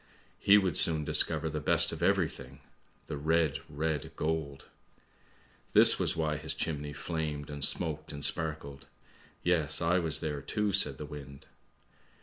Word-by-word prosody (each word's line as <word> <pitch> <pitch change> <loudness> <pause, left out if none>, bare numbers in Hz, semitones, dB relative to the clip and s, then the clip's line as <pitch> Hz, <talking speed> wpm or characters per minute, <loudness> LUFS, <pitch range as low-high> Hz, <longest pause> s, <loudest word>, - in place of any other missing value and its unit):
He 100 +1 +6
would 95 -5 +1
soon 80 -2 +1
discover 75 +1 +4
the 75 0 -3
best 75 - +2
of - - -7
everything, - - -1 0.4
the 75 - -6
red, 80 -1 +1
red 75 0 -3
gold! 75 -3 -3 0.5
:< - - -33
This - - +6
was - - 0
why 75 -1 -1
his - - -5
chimney 75 -2 -4
flamed 75 -2 -5
and 70 -1 -5
smoked 80 -2 +1
and 70 -1 -1
sparkled. 75 -4 -3 0.6
Yes, 80 -4 +2
I 90 +2 +2
was 80 -3 -1
there, 75 -3 -4
too," 105 +7 -2
said 95 - +2
the 75 - -7
wind. 70 -1 -11
75 Hz, 150 wpm, -30 LUFS, 75-80 Hz, 0.6 s, He